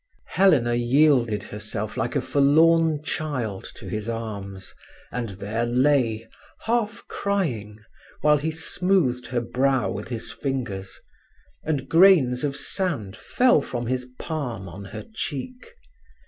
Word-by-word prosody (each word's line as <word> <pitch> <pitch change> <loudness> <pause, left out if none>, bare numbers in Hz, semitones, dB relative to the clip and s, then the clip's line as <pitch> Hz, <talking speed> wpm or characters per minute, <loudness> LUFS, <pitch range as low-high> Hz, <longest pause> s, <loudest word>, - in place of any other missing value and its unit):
Helena 150 -12 +4
yielded 120 -2 +3
herself 105 +1 -4
like - - -2
a - - +2
forlorn 155 +2 +4
child 130 -12 -3
to - - -9
his 105 +4 -4
arms, 100 -4 -6 0.4
and 120 -3 -3
there 105 +4 -2
lay, 120 -2 +2 0.3
half 230 -1 -1
crying, 125 - -2 0.4
while 150 -1 +4
he 155 +3 -1
smoothed 160 -5 0
her 120 -1 -1
brow 130 +1 +1
with 100 +1 -5
his 115 -2 -5
fingers, 120 -9 -4 0.6
and 145 -4 -2
grains 160 -7 +5
of 140 -1 -1
sand 145 - -2
fell 245 - +3
from 120 -3 -4
his 125 +1 -2
palm 125 - -4
on 95 +2 -9
her 95 - -7
cheek. 235 - -5
130 Hz, 125 wpm, -24 LUFS, 115-155 Hz, 0.6 s, grains